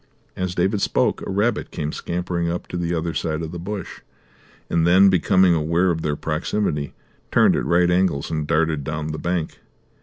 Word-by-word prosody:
As 90 -1 -3
David 100 +3 +1
spoke - - +1
a - - -6
rabbit 105 +4 0
came 75 -2 -4
scampering 85 0 -2
up 85 +1 -3
to - - -6
the 85 -1 -2
other 85 -1 -1
side 80 0 -2
of 80 - -5
the 85 - -6
bush, 100 +3 -6 0.7
and 85 0 +1
then, 95 +3 +6
becoming 95 0 +4
aware 85 +3 +2
of 80 -1 -2
their 75 -2 -1
proximity, 75 -1 -2 0.4
turned - - +4
at - - -1
right 85 +1 +3
angles 90 -6 +1
and 75 -2 -2
darted 80 -2 +1
down 75 +1 -4
the 75 - -5
bank. 85 -2 -2
85 Hz, 185 wpm, -22 LUFS, 80-90 Hz, 0.7 s, then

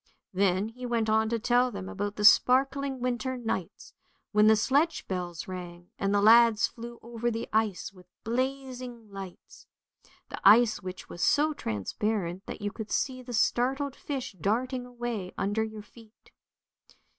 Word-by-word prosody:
Then 190 +2 +1
he 250 +3 -12
went 230 -3 0
on 220 0 +2
to 230 - 0
tell 245 +3 +2
them 200 -4 -7
about 205 +1 -4
the 210 - -1
sparkling 270 +3 +4
winter 250 +1 -2
nights 220 -7 -5 0.4
when 210 0 +5
the 220 - +7
sledge 285 +9 +1
bells 175 -3 -4
rang 175 -1 -8
and 195 0 0
the 205 0 +2
lads 230 0 +6
flew 235 0 -8
over 235 0 -2
the 230 0 -4
ice 215 -3 0
with 180 -2 -18 0.2
blazing 250 -2 -4
lights, 195 -2 -10 0.6
the - - -7
ice 220 +3 +6
which 185 0 -8
was 175 - -8
so 305 +1 +3
transparent 185 - -3
that - - -7
you 205 - -1
could 220 -1 -7
see 255 -2 -1
the 250 0 -9
startled 265 +4 +1
fish 275 -4 -5
darting 245 - -1
away 240 -6 -5
under 205 +3 0
your 220 -1 -7
feet. 225 0 -19
225 Hz, 155 wpm, -28 LUFS, 200-250 Hz, 0.6 s, the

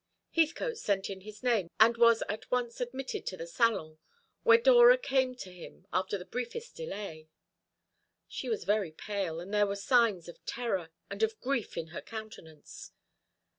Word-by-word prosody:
Heathcote 340 +9 +1
sent 200 - -1
in 190 -1 -7
his 210 +2 -11
name, 225 -9 +2
and 230 +2 +7
was 235 -1 +5
at 210 +2 -5
once 245 -1 -1
admitted 260 +2 -4
to 185 - -3
the 165 - -6
salon, 170 -5 0 0.4
where 460 -1 +7
Dora - - +7
came 265 - 0
to 190 -7 -9
him 180 +1 -12
after 190 +2 0
the 180 - -9
briefest 345 - -5
delay. 195 - -7 1.0
She - - -5
was 445 - -1
very 205 -5 +1
pale, 185 -1 -3
and 185 +4 -8
there 210 -1 +4
were 200 - -2
signs 205 -4 +2
of 175 - -12
terror, 195 -9 -2 0.2
and 200 +1 -5
of 220 0 +1
grief 255 -4 -2
in 160 - -4
her 165 - -6
countenance. 215 -9 -10
215 Hz, 170 wpm, -31 LUFS, 185-250 Hz, 1.0 s, and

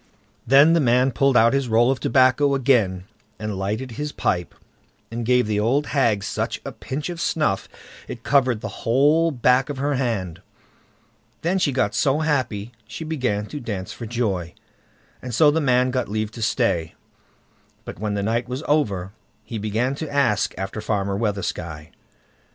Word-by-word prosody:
Then 140 +6 +6
the 170 - +4
man 125 -1 +3
pulled 135 +1 +2
out 115 +2 +5
his 135 -2 0
roll 120 +3 +4
of 135 - -2
tobacco 135 +3 +3
again, 115 -9 +2 0.3
and 105 -1 -4
lighted 105 +7 -3
his 150 +5 -4
pipe, 90 -9 -2 0.6
and 115 +1 -4
gave 125 +1 +3
the 105 -1 0
old 130 +7 +1
hag 115 -8 +2
such - - -3
a - - -4
pinch 140 +4 -5
of 170 -1 -5
snuff 150 -13 0 0.4
it 115 - -8
covered 130 -5 +2
the 110 -3 -7
whole 145 +8 +3
back 125 -1 +2
of 145 - -4
her 145 +2 0
hand. 110 - -2 1.0
Then 180 +4 +1
she 150 - +2
got 125 -6 0
so 140 +7 +1
happy 120 -8 -1 0.2
she 115 +8 -7
began 125 -10 -1
to 145 +7 -7
dance 105 -4 -5
for 115 - -7
joy, 100 -8 -2 0.7
and 125 -3 -5
so 150 +3 +6
the 160 +2 0
man 125 -2 +2
got 125 -3 -2
leave 110 0 -2
to 115 - -9
stay. 105 -8 0 0.9
But - - -8
when 105 -1 -2
the 100 - -1
night 115 +3 -1
was 130 +4 -4
over, 100 -12 0 0.3
he 115 - -6
began 110 +5 -1
to 155 - -4
ask 135 -8 +1
after 95 +3 -4
Farmer 100 -2 -1
Weathersky. 90 -7 -3
120 Hz, 170 wpm, -22 LUFS, 105-135 Hz, 1.0 s, Then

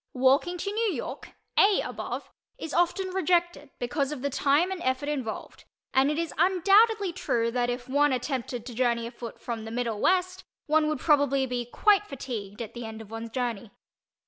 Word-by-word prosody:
Walking 275 +8 +3
to 400 +3 -3
New 435 -1 0
York - - -6 0.3
("a" 405 -1 +5
above) - - -5 0.3
is 320 - -6
often 350 +2 +1
rejected 345 -4 0
because 275 +3 -1
of 285 -3 -6
the 280 - 0
time 290 +7 +2
and 375 -2 -4
effort 260 +1 -1
involved 260 -7 -5 0.3
and 265 +2 +4
it 300 - -1
is 335 0 -2
undoubtedly 395 +2 +4
true 230 -9 0
that 245 0 0
if 245 0 -4
one 290 +2 +3
attempted 250 -2 -3
to 245 - -7
journey 235 -1 +1
afoot 235 -1 -8
from 230 -2 -5
the 225 - -7
middle 230 -2 -2
west 370 0 +1 0.2
one 310 0 +3
would 305 -3 -2
probably 280 -3 +3
be 245 -1 -3
quite 410 - +3
fatigued 230 -6 -6
at 225 0 -10
the 240 - -6
end 220 0 -7
of 220 -1 -11
one's 225 0 -5
journey. 240 -3 -3
275 Hz, 185 wpm, -27 LUFS, 240-345 Hz, 0.3 s, a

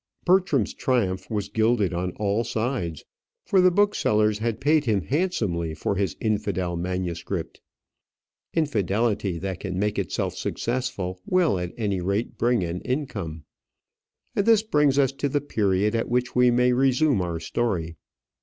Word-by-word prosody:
Bertram's 180 - +3
triumph 100 -8 -1
was 105 -3 -2
gilded 110 -4 +1
on 90 +1 -2
all 105 +2 0
sides; 110 - -3 0.4
for 190 - +4
the 185 - +6
booksellers 110 - +2
had 115 0 -2
paid 150 +1 +3
him 105 -6 +1
handsomely 105 - -1
for 80 - -1
his 95 -4 -1
infidel 95 -5 -1
manuscript. 90 0 -4 0.9
Infidelity 105 - 0
that 95 0 -4
can 95 -3 -4
make 105 +2 0
itself - - -2
successful 100 -7 -3
will, 175 - +2
at 90 0 -4
any 100 -5 -1
rate, 100 +5 -1
bring 120 -4 +1
an 85 +1 -3
income. 105 - -4 0.9
And 200 - +1
this 225 -2 +5
brings 150 -9 +2
us 135 -2 +4
to 140 +1 -2
the 145 - +1
period 105 -6 0
at 115 - -1
which 125 0 0
we 125 0 +5
may 125 +1 +3
resume 135 -2 +3
our 85 -2 -3
story. 85 -2 -2
110 Hz, 145 wpm, -25 LUFS, 95-130 Hz, 0.9 s, the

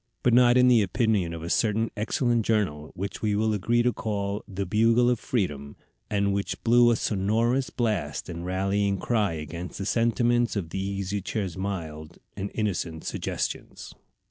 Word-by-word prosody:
But 125 - +3
not 120 0 +6
in 125 0 +6
the 120 -3 +6
opinion 105 -3 +1
of 85 -1 -6
a 85 - -5
certain 110 0 +1
excellent 120 +2 +1
journal, 95 -10 -1
which 100 +3 -5
we 105 -2 +1
will 110 +1 +1
agree 115 +4 +1
to 125 0 +2
call 100 -1 -3
the 100 0 -4
Bugle 115 +5 +3
of 120 - 0
Freedom, 75 - -2 0.3
and 100 -1 +1
which 100 0 -3
blew 120 +1 +5
a 120 - +4
sonorous 115 +6 0
blast 100 - -2
and 85 0 -6
rallying 100 +2 0
cry 105 -4 0
against 80 +3 -6
the 95 - -4
sentiments 120 +2 +2
of 85 -6 -3
the 95 - -2
Easy 100 0 -3
Chair's 95 -3 -3
mild 85 -5 -5 0.2
and 100 0 -4
innocent 90 -7 -2
suggestions. - - -4
100 Hz, 170 wpm, -26 LUFS, 95-115 Hz, 0.3 s, not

